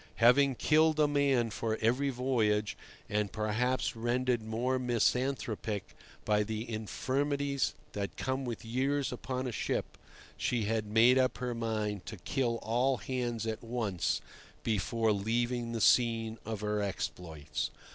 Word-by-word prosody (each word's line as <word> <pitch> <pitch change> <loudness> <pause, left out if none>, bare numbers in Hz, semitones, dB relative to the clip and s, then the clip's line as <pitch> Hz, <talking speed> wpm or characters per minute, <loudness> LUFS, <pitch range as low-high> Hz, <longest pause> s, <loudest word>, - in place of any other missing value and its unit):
Having 130 +3 +5
killed 155 +3 +3
a 150 - +5
man 140 -5 +2
for 110 +1 -1
every 125 +5 +2
voyage, 110 -6 +1 0.3
and 105 -1 0
perhaps 115 +5 0
rendered 120 +1 0
more 120 +4 -1
misanthropic 120 -3 0 0.3
by 105 0 +3
the 110 +2 -3
infirmities 140 +5 -1 0.2
that 100 -1 -4
come 130 +1 -1
with 120 -2 -5
years 135 +4 0
upon 130 +1 -3
a 125 - -2
ship, - - -2 0.4
she 120 -3 0
had 110 0 -1
made 115 +5 +5
up 130 0 +2
her 125 -1 -2
mind 110 -4 -2
to 110 - -6
kill 120 +5 -1
all 125 +4 +2
hands 120 0 -2
at 110 0 -3
once 115 -7 -1 0.4
before 110 +1 +1
leaving 115 +3 0
the 115 - -2
scene 115 -2 +3
of 110 -2 -4
her 105 0 0
exploits. 85 -6 -3
115 Hz, 135 wpm, -32 LUFS, 110-130 Hz, 0.4 s, Having